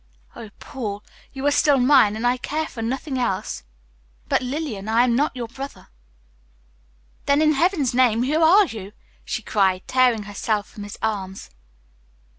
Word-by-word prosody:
Oh, 220 - -9
Paul, 210 -5 -6 0.3
you 270 +1 -6
are 290 - +4
still 285 -1 +4
mine, 255 -5 +5
and 225 +2 -3
I 245 +1 +2
care 305 +5 -3
for 235 - -8
nothing 265 +3 -3
else." 210 -4 -2 0.7
"But, - - +1
Lillian, 250 -6 -4
I 230 +2 +4
am 240 -2 +2
not 285 +2 0
your 240 -2 -4
brother." 270 +4 -9 1.4
"Then, 280 +1 +4
in 305 0 +4
heaven's 305 -4 +1
name, 245 -2 +3
who 300 +5 +1
are 375 +6 +6
you?" 210 - -8 0.3
she 240 -2 -4
cried, 190 -3 +1
tearing 250 -4 +2
herself 205 +1 -2
from 210 - -12
his 205 - -9
arms. 195 - -3
245 Hz, 160 wpm, -22 LUFS, 215-280 Hz, 1.4 s, are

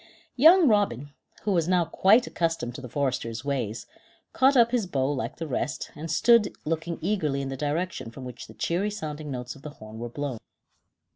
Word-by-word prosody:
Young 325 +5 +7
Robin, 145 - +1 0.3
who 210 - 0
was 170 -4 +2
now 180 -2 +3
quite 215 +9 +4
accustomed 165 -8 -2
to 135 - -8
the 125 - -8
foresters' 130 -3 -2
ways, 115 -6 -2 0.5
caught 265 +1 +4
up 235 -1 +5
his 235 -6 0
bow 135 -4 0
like 130 -3 -3
the 165 - -5
rest, 145 0 -3
and 160 +2 -6
stood 225 +6 +4
looking 165 +2 -2
eagerly 160 -7 0
in 135 -1 -3
the 135 - -4
direction 150 -2 -2
from 130 +3 -9
which 125 - -8
the - - -14
cheery 185 +5 0
sounding 155 -7 -6
notes 125 -2 -5
of 140 - -15
the 150 - -7
horn 110 +1 -10
were 120 +1 -5
blown. 135 -2 -4
150 Hz, 195 wpm, -26 LUFS, 130-190 Hz, 0.5 s, Young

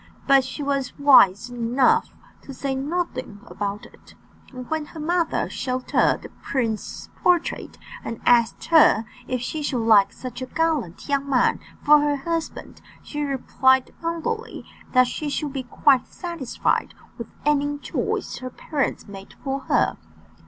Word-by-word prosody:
But 275 -1 +5
she 260 +3 -6
was 275 -2 -2
wise 245 -6 +5
enough 245 - +2 0.3
to 275 - -10
say 275 +1 -2
nothing 265 - -3
about 205 +3 -4
it; - - -18 0.4
and 255 -2 -8
when 315 -1 -2
her 315 - -11
mother 340 +2 0
showed 255 -1 -4
her - - +3
the - - -11
prince's 230 -5 -3
portrait, 355 -2 +1 0.3
and 230 - -5
asked 235 -2 +3
her 230 -8 +6 0.2
if 255 -2 -2
she 305 +5 -4
should 255 -6 -1
like 210 -3 +6
such 255 0 -8
a 255 - -4
gallant 300 - -1
young 280 -1 -1
man 255 -2 +2 0.2
for 300 +1 +7
her 290 0 +1
husband, 330 +3 -4 0.2
she 295 - -5
replied 260 -2 +2
humbly 335 +8 -4 0.3
that 255 -1 +6
she 295 +4 -4
should 285 0 -3
be 270 - -2
quite 255 +1 +2
satisfied 340 -8 -2 0.2
with - - -5 0.2
any 290 0 +1
choice - - -3
her 255 - -6
parents 280 +1 -3
made 195 -1 -11
for 270 0 -2
her. - - +2
275 Hz, 150 wpm, -23 LUFS, 245-300 Hz, 0.4 s, for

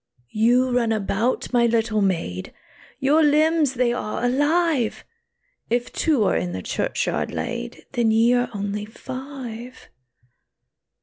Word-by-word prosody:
"You 245 +4 +3
run 240 -2 +1
about, 220 +4 -1
my 240 -1 +4
little 225 -2 +1
maid, 165 - -2 0.4
Your 290 +4 +3
limbs 305 -1 +3
they 240 -1 +2
are 240 0 -3
alive; 290 -1 +1 0.6
If 240 +1 -1
two 300 -9 +2
are - - +2
in 90 0 -2
the 95 0 -5
churchyard - - -1
laid, - - -5
Then 235 -2 +1
ye 225 +2 +4
are 245 0 +1
only 205 0 -3
five." 255 0 -8
240 Hz, 125 wpm, -23 LUFS, 215-265 Hz, 0.6 s, my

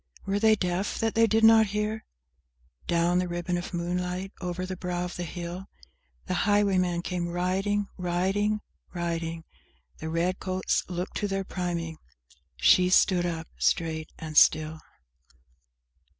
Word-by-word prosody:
Were 195 +1 0
they 220 0 +5
deaf 185 0 -2
that 225 -1 0
they 225 0 +4
did 220 +1 +2
not 220 -1 +7
hear? 210 +2 -2 0.8
Down 170 +1 +2
the 180 - -1
ribbon 175 0 -2
of 175 0 -4
moonlight, 180 +2 -3
over 180 0 -3
the 185 0 -5
brow 180 -1 -3
of 180 - -6
the - - -5
hill, 175 +2 -6 0.6
The - - -2 0.2
highwayman 185 -4 +2
came 180 -2 -2
riding, 190 +4 0
Riding, 190 +4 0 0.3
riding! 165 -1 -3 0.6
The 160 - -5
red 170 +3 0
coats 185 0 0
looked 180 +1 -4
to 205 - -1
their 195 0 -2
priming! 170 -4 -4 0.6
She 125 - +5
stood 180 -1 +4
up, 165 -1 -4
straight 160 -1 0
and 155 -1 -7
still! 155 0 +3
180 Hz, 140 wpm, -27 LUFS, 170-195 Hz, 0.8 s, not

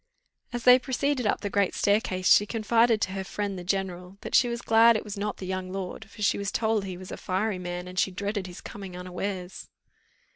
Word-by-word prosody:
As 240 -1 -4
they 250 +1 +8
proceeded 260 -1 0
up - - 0
the 205 - -2
great 200 -1 +1
staircase, 200 -3 +3
she 205 - +4
confided 225 0 +2
to 185 - 0
her 190 0 -3
friend, 200 0 -3
the 180 - -6
general, 185 0 -3
that - - -7
she 245 - +5
was 235 0 -4
glad 225 +1 +6
it - - -5
was 210 -2 -6
not 205 0 -3
the 190 - -7
young 185 0 -4
lord, 195 +3 -6
for 215 - -8
she 200 - +2
was 200 0 -2
told 220 -2 0
he 185 -2 -5
was 185 0 -10
a - - -5
fiery 190 +1 -1
man, 180 0 -5
and 185 +1 -3
she - - +3
dreaded 200 +1 -3
his 180 0 -10
coming 195 -3 -8
unawares. 180 +1 -5
200 Hz, 225 wpm, -27 LUFS, 185-220 Hz, -, they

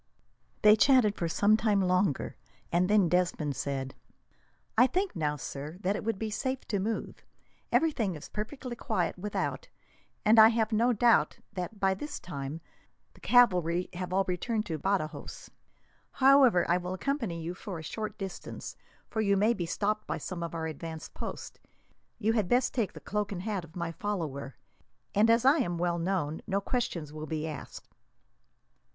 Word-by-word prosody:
They 210 0 +8
chatted 240 -2 +5
for 170 - -2
some 205 +5 +4
time 215 -2 +2
longer, 185 -5 +1 0.4
and 180 +2 +2
then 205 -3 +5
Desmond 170 -5 0
said: 135 0 -3 0.8
"I 250 +3 +6
think 375 - -1
now, 150 -3 0
sir, 145 +3 -6
that 200 +1 +1
it - - -4
would 225 -1 -1
be 220 +1 -3
safe 260 +4 -2
to 200 - 0
move. 220 +4 -3 0.5
Everything 235 - +1
is 150 - -9
perfectly 240 +3 -5
quiet 185 -7 -1
without, 210 - -3 0.6
and 220 +1 +6
I 220 - +11
have 225 0 +1
no 230 +3 +3
doubt 235 +1 +3 0.2
that, 195 +2 -5
by 195 -1 +3
this 295 +11 -6
time, 145 -1 -6 0.5
the - - -19
cavalry 180 -8 +3
have 180 0 -5
all 195 +1 +3
returned 215 +5 -1
to 160 -2 -4
Badajos. 190 -2 -3 0.6
However, 265 -8 +5
I 175 - +3
will 180 +1 -4
accompany 230 - -2
you 165 +2 -4
for 185 0 -7
a 160 - -8
short 215 +6 -5
distance, 195 -3 -7 0.3
for 220 - -2
you 200 -2 +3
may 215 +4 +4
be 175 -6 -3
stopped 210 +4 -1
by - - -2
some 180 -3 -6
of 170 0 -4
our 160 -1 -3
advance 160 +1 -6
posts. - - -7 0.6
You 225 0 +1
had 210 -6 0
best 250 +1 +2
take 230 -7 -1
the - - -9
cloak 210 -1 -2
and 185 -2 -4
hat 205 -4 -2
of 165 0 -15
my 170 -2 -3
follower, 160 -9 -4 0.6
and, 215 +3 +4
as 230 +2 +4
I 275 +4 +6
am 175 -9 -1
well 175 0 0
known, 165 -4 -1
no 200 -1 +1
questions 195 - -3
will 155 0 -6
then 160 - -2
be 155 +1 -3
asked." 150 -3 -8
195 Hz, 175 wpm, -30 LUFS, 170-220 Hz, 0.8 s, I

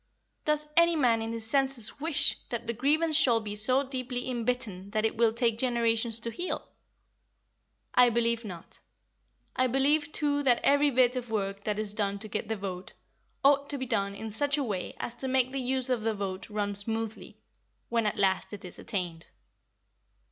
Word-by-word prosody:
Does 300 0 +1
any 335 0 +5
man 240 -7 +3
in 225 0 -3
his 230 -1 -4
senses 270 -2 +1
wish 310 0 +2
that 235 -1 -4
the 235 - -2
grievance 305 +6 +1
shall 245 -6 +4
be 210 -2 -5
so 255 +6 +4
deeply 255 -2 -4
inbitten 235 -6 -2
that 215 0 +1
it 220 - 0
will 230 -1 +3
take 230 -1 0
generations 230 -2 +1
to 230 - -2
heal? 350 +11 -4 1.3
I 250 -1 +6
believe 235 0 +1
not. 180 -6 -10 0.8
I 255 - +2
believe 290 +4 +2
too 290 -2 0
that 250 -4 +3
every 285 +1 +4
bit 255 -1 +3
of 245 -2 -4
work 200 -2 -3
that 210 -1 -1
is 215 -1 -2
done 200 -2 -1
to 215 +2 -9
get 215 0 -3
the 220 - -1
vote 185 -2 -6 0.5
ought 280 0 +4
to 285 - -1
be 260 - -3
done 200 -4 -1
in 220 +2 -6
such 285 +6 +1
a 285 - 0
way 200 -7 -4
as 235 - -4
to 265 - -2
make 260 -1 +2
the 270 0 -3
use 260 0 0
of 245 -3 +1
the 220 0 -1
vote 195 -1 -5
run 205 -1 -2
smoothly, 220 +2 -3 0.5
when 230 -2 +1
at - - -2
last 195 0 +1
it 205 -1 -8
is 180 - -8
attained. 175 -4 -4
235 Hz, 190 wpm, -29 LUFS, 210-265 Hz, 1.3 s, I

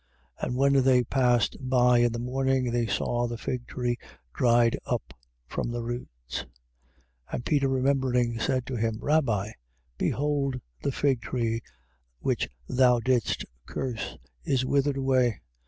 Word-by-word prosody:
11:20. - - 0
And 125 - -2
when 140 +1 +4
they 125 -1 +5
passed 125 -1 +2
by 125 -2 +4
in 120 0 +4
the 120 - -3
morning 130 +1 0
they 120 -1 +1
saw 120 +3 0
the 120 0 -4
fig 120 +1 -4
tree 120 -1 -1 0.4
dried 120 -1 +4
up - - -3 0.3
from 90 - -3
the 120 0 -3
roots. 60 - -5 0.9
11:21. - - -12
And 120 - -3
Peter 140 -3 +2
remembering, 130 -3 +1
said 130 +1 0
to 130 -1 -4
him: 115 0 0
Rabbi, 120 -10 +1 0.5
behold 140 -2 0 0.2
the - - 0
fig 135 -2 +1
tree 115 -2 -1 0.6
which - - 0 0.2
thou 125 -1 +4
didst 125 -2 +1 0.2
curse 125 -4 -4 0.3
is 130 - +1
withered 140 +1 +1
away. 130 -4 +2
125 Hz, 145 wpm, -27 LUFS, 120-135 Hz, 0.9 s, they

